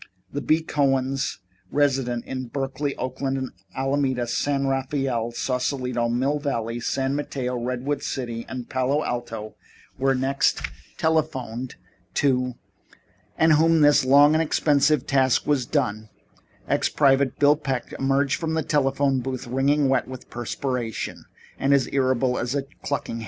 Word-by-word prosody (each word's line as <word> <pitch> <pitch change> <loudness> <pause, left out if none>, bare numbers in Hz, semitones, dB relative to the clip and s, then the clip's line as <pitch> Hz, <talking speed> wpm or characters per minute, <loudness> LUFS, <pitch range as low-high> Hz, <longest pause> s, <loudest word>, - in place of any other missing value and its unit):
The 145 - -2
B. 155 +5 +2
Cohens 135 -2 0 0.3
resident 130 -4 +1
in 130 -1 -5
Berkeley, 135 +2 -3
Oakland, 130 +1 -3 0.2
Alameda, 135 -2 0
San 140 +3 0
Rafael, 135 -3 -1
Sausalito, 125 -1 -1
Mill 135 +5 +1
Valley, 120 -5 -2
San 135 +3 -1
Mateo, 130 -3 -3
Redwood 125 +4 -2
City 120 -3 -4
and 125 -2 -6
Palo 130 +3 0
Alto 115 -3 -4 0.5
were 135 0 +2
next 135 +2 +1 0.4
telephoned 130 -7 -1 0.4
to, 125 -3 +1 0.8
and 160 -1 +5
when 165 -1 +4
this 145 -2 +6
long 140 +3 +6
and 160 - +3
expensive 150 -3 +2
task 130 -2 +2
was 135 -5 +1
done, 110 -7 -1 0.6
Ex - - +1
Private 135 -2 +3
Bill 145 +1 +5
Peck 135 -5 -3
emerged 135 +1 +1
from 160 -1 -2
the 160 - 0
telephone 135 -2 +1
booth 130 0 -4
wringing 135 +3 +2
wet 130 -2 +1
with 130 -1 -10
perspiration 120 -1 -4 0.3
and 140 +1 +4
as 135 -3 +2
irritable 130 -2 +1
as 120 +3 -2
a 140 - 0 0.2
clucking 140 -4 -3
hen. - - -5
135 Hz, 135 wpm, -24 LUFS, 125-145 Hz, 0.8 s, this